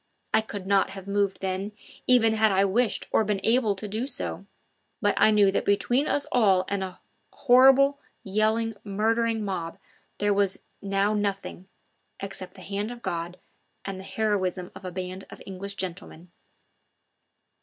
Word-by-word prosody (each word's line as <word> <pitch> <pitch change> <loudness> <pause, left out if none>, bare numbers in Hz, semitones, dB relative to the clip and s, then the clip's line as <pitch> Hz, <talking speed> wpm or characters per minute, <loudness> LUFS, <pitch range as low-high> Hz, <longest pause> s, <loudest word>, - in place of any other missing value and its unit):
I - - +5
could 205 -3 -7
not 195 0 +3
have 195 0 -9
moved 200 -1 0
then, 190 +2 -3 0.3
even 230 -3 +5
had 220 -1 +3
I 195 +1 +3
wished 220 +4 +1
or - - +3
been 205 -1 -1
able 225 -3 +3
to 210 +2 -5
do 220 +6 -3
so; - - -4 0.5
but - - +2
I - - +5
knew 205 -2 +5
that - - 0
between 245 +7 +1
us 285 - +1
all 195 -6 +4
and 200 -1 -1
a 185 -1 -7 0.3
horrible, 270 +2 +5 0.2
yelling, 220 +3 +1
murdering 225 +2 0
mob 170 -4 -4 0.4
there 205 0 +2
was 200 -1 +1 0.2
now 200 +1 +1
nothing 200 -3 -3 0.5
except 190 -2 -5
the 190 - -12
hand 200 +3 -3
of 240 0 -9
God 170 +1 -3 0.5
and 195 -1 -5
the - - -8
heroism 190 -4 -1
of 190 - -11
a 185 - -4
band 185 +1 -6
of - - -11
English 195 +1 -6
gentlemen. 180 -2 -5
200 Hz, 160 wpm, -26 LUFS, 190-220 Hz, 0.5 s, I